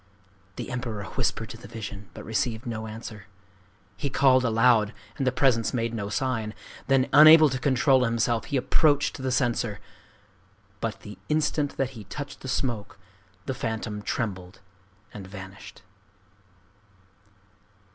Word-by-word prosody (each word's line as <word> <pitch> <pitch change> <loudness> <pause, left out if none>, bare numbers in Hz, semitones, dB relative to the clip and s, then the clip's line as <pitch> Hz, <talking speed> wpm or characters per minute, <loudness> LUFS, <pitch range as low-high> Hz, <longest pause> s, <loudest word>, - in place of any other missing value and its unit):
The - - -6
Emperor 120 -5 -4
whispered 110 - -1
to 115 - -9
the 120 - -12
vision, 105 -3 -8
but - - -9
received 115 +2 -1
no 110 -2 -4
answer. 110 -1 -9 0.7
He 140 - -3
called 130 -1 +4
aloud, 115 -2 +3 0.2
and 135 - -1
the - - +4
presence 125 -3 +2
made 115 -1 -1
no 100 -3 -3
sign. 115 -3 -2 0.3
Then 135 -1 +3
unable 155 +1 +9
to 130 -1 -3
control 130 0 +3
himself, 115 -1 0
he 140 - -1
approached 145 +2 +2
the 130 0 -1
censer. 120 -5 0 1.0
But 115 -1 -4
the 105 0 -10
instant 150 -1 0
that 135 -1 0
he 110 -6 -10
touched 145 +8 -7
the - - -9
smoke, 120 -6 -2 0.5
the 130 - -2
phantom 110 -3 -4
trembled 95 -5 -4 0.5
and 100 -3 -8
vanished. 95 0 -11
115 Hz, 135 wpm, -26 LUFS, 110-130 Hz, 1.0 s, unable